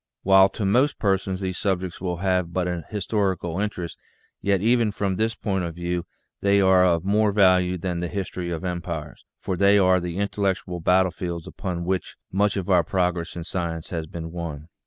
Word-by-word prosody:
While 95 0 +6
to 105 - -1
most 125 +9 +3
persons 95 -2 0
these 95 -1 -3
subjects 95 -3 -2
will 90 -2 -2
have 90 -1 0
but 90 0 -1
an 90 -2 -3
historical 95 -4 -1
interest, 100 -5 -4 0.4
yet 100 -1 +2
even 115 +1 +3
from 100 -2 -1
this 110 +2 0
point 95 -4 -1
of 85 -2 -4
view 85 0 -3 0.3
they 100 0 +4
are 95 -1 +5
of 85 -1 +2
more 105 +1 +3
value 90 -2 +4
than 90 0 -3
the 85 - -2
history 90 -1 -4
of 85 0 -4
empires, 85 -4 -5 0.2
for 95 - -2
they 100 +3 +5
are 95 -1 +4
the 90 0 -4
intellectual 100 -3 -1
battlefields 90 -1 +1
upon 90 -3 -4
which 95 0 -2 0.2
much 100 +1 +1
of 95 - -3
our 90 -3 +4
prog 90 +1 +1
ress 85 -1 -6
in 85 - -5
science 85 -2 -4
has 80 -3 -3
been 80 0 -7
won. 80 -3 -6
90 Hz, 190 wpm, -24 LUFS, 85-100 Hz, 0.4 s, While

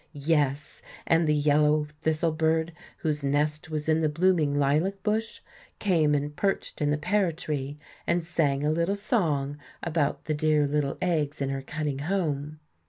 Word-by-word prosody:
Yes, 145 -1 0 0.2
and 165 0 +3
the 150 - +3
yellow 150 +1 +3 0.2
thistle 160 +1 +1
bird, 160 +1 +1 0.3
whose 150 -3 -1
nest 150 +2 0
was 155 -1 -3
in 160 0 +3
the 155 - +2
blooming 160 -3 +2
lilac 155 +8 +1
bush, 220 +1 -1 0.4
came 160 -7 +2
and 145 +1 -2
perched 195 -3 -2
in 145 - +2
the 150 - +1
pear 185 +3 +1
tree 150 -4 -4 0.3
and 170 -1 +1
sang 145 -5 0
a 150 - +2
little 170 +5 +1
song 150 - 0 0.2
about 160 -4 -1
the 155 - 0
dear 150 0 +2
little 145 -1 -1
eggs 155 -4 0
in 135 -1 -1
her 135 0 -2
cunning 145 0 -3
home. 155 -3 -2
155 Hz, 165 wpm, -27 LUFS, 145-165 Hz, 0.4 s, and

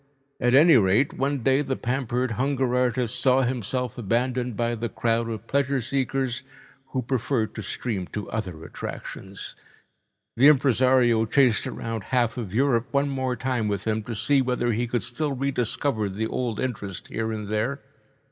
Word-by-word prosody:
At 120 +1 +3
any 155 +1 +7
rate, 105 +6 +3
one 135 -1 -1
day 135 +3 +4
the 135 -2 -2
pampered 125 0 -1
hunger 130 +2 0
artist 125 -1 +1
saw 130 0 +4
himself 125 0 -2
abandoned 120 +1 -1
by 120 0 0
the 120 0 -3
crowd 115 0 0
of 110 -1 -5
pleasure 140 +1 +1
seekers, 130 +1 -1 0.5
who 130 -1 -2
preferred 125 -2 -1
to 110 - -5
stream 100 -1 -3
to 105 - -5
other 90 -8 -4
attractions. 95 +3 -7 0.8
The 135 +4 +7
impresario 130 -4 +4
chased 125 -1 +3
around 115 -3 -4
half 120 -3 +1
of 115 -7 -5
Europe 120 +1 +2
one 140 0 +1
more 130 -2 -1
time 125 -2 -1
with 100 -1 -2
him, 110 0 0
to 115 - -4
see 135 +7 +2
whether 125 -1 0
he 120 +3 -1
could 120 +1 -1
still 145 +4 -2
re 135 +1 -1
discover 120 -3 -1
the 105 +4 -2
old 120 -1 -2
interest 100 -8 -4
here 110 0 -2
and 105 -2 -4
there. 110 +7 -1
125 Hz, 165 wpm, -25 LUFS, 110-130 Hz, 0.8 s, any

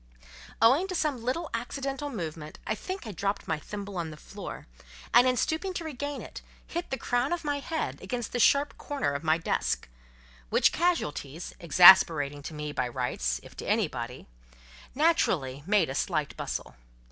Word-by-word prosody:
Owing 275 +11 +5
to 370 - -4
some 295 -7 0
little 300 +7 -2
accidental 275 +4 -3
movement—I 160 - -5
think 370 - -6
I 220 - -5
dropped 200 +2 -2
my 160 -2 -1
thimble 200 +1 -7
on 165 -2 -2
the 155 - -10
floor, - - -8 0.5
and 245 +2 +7
in 255 -1 +2
stooping 360 - -1
to 335 - -3
regain 290 -2 -4
it, - - -9 0.2
hit 345 +1 -4
the 265 - -2
crown 245 +3 0
of 345 -1 -1
my 290 -1 -1
head 320 +3 -3
against 240 -4 -4
the 245 - -2
sharp 280 +4 +3
corner 275 - -2
of 140 - -4
my 160 0 +3
desk; 165 - -1 0.6
which - - +4
casualties 170 - -1
(exasperating 165 -4 +7
to 155 +2 -7
me, 150 0 -4
by 130 -3 -1
rights, 120 - -2
if - - -14
to - - -5
anybody) - - -1 0.7
naturally 180 - +2
made 200 -4 +4
a 135 - -4
slight 155 0 -1
bustle—M. - - -4
220 Hz, 170 wpm, -28 LUFS, -, 0.7 s, and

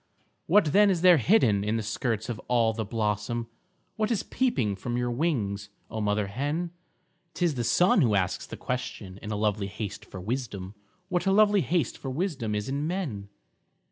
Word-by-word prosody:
What 170 -5 +4
then 205 0 +6
is 180 -4 +1
there 180 -2 +7
hidden 120 - +3
in 105 +2 0
the 110 - -2
skirts 110 0 -2
of 120 -4 -4
all 115 -2 +3
the 110 0 -2
blossom, 110 +2 -2 0.5
What 215 0 +1
is 230 -5 0
peeping 130 - 0
from 120 +5 -3
your 120 0 0
wings, 110 -8 -1 0.2
oh 110 - -3
mother 105 0 +1
hen? 145 - -2 0.6
'T 175 - +1
is 165 - +2
the 120 -3 -2
sun 180 - +4
who 115 -7 +3
asks 95 -2 0
the - - -8
question, 115 -7 -5
in 105 - -7
a 110 - -2
lovely 105 -1 0
haste 100 +1 -6
for 95 - -9
wisdom 105 -3 -4 0.4
What 180 0 0
a - - +4
lovely 205 0 +5
haste 165 -6 0
for 135 - -5
wisdom 130 - -2
is 105 0 -2
in 140 +3 -1
men? 140 - -3
120 Hz, 190 wpm, -27 LUFS, 105-170 Hz, 0.6 s, there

